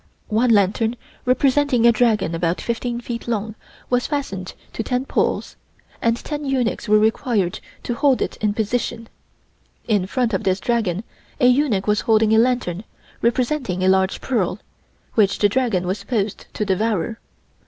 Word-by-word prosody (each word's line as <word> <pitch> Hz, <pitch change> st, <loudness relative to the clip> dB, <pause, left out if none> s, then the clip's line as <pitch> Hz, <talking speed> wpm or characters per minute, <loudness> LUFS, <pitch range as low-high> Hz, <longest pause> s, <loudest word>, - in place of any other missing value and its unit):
One 230 Hz, +3 st, +2 dB
lantern 220 Hz, +2 st, +2 dB, 0.3 s
representing 260 Hz, -1 st, +3 dB
a 235 Hz, -, +8 dB
dragon 215 Hz, -7 st, +2 dB
about 165 Hz, +1 st, 0 dB
fifteen 235 Hz, 0 st, -2 dB
feet 235 Hz, -1 st, -6 dB
long 220 Hz, -2 st, -2 dB, 0.3 s
was 245 Hz, 0 st, +1 dB
fastened 195 Hz, -11 st, -4 dB, 0.2 s
to -, -, -3 dB
ten 250 Hz, +3 st, -1 dB
poles, -, -, -1 dB, 0.4 s
and 230 Hz, 0 st, +2 dB
ten 295 Hz, +3 st, -5 dB
eunuchs 255 Hz, -5 st, -1 dB
were 215 Hz, -, +6 dB
required 215 Hz, -3 st, +1 dB, 0.2 s
to 240 Hz, -, -2 dB
hold 270 Hz, +1 st, +2 dB
it -, -, -2 dB
in 210 Hz, -1 st, 0 dB
position. 230 Hz, +1 st, -2 dB, 0.8 s
In 205 Hz, -5 st, +1 dB
front 240 Hz, +1 st, 0 dB
of 190 Hz, -, 0 dB
this 190 Hz, 0 st, +1 dB
dragon 220 Hz, -5 st, 0 dB, 0.4 s
a -, -, +3 dB
eunuch 250 Hz, -6 st, +3 dB
was 210 Hz, 0 st, +2 dB
holding 220 Hz, -1 st, +3 dB
a 220 Hz, -, +6 dB
lantern 230 Hz, -6 st, +1 dB, 0.4 s
representing 240 Hz, -5 st, 0 dB
a -, -, +3 dB
large 190 Hz, 0 st, +2 dB
pearl, 205 Hz, -8 st, 0 dB, 0.6 s
which 200 Hz, -3 st, +3 dB
the 205 Hz, -, +4 dB
dragon 225 Hz, -6 st, 0 dB
was 190 Hz, +3 st, -2 dB
supposed 200 Hz, -1 st, -2 dB
to 210 Hz, -, -1 dB
devour. 210 Hz, +1 st, -1 dB
225 Hz, 155 wpm, -21 LUFS, 200-245 Hz, 0.8 s, a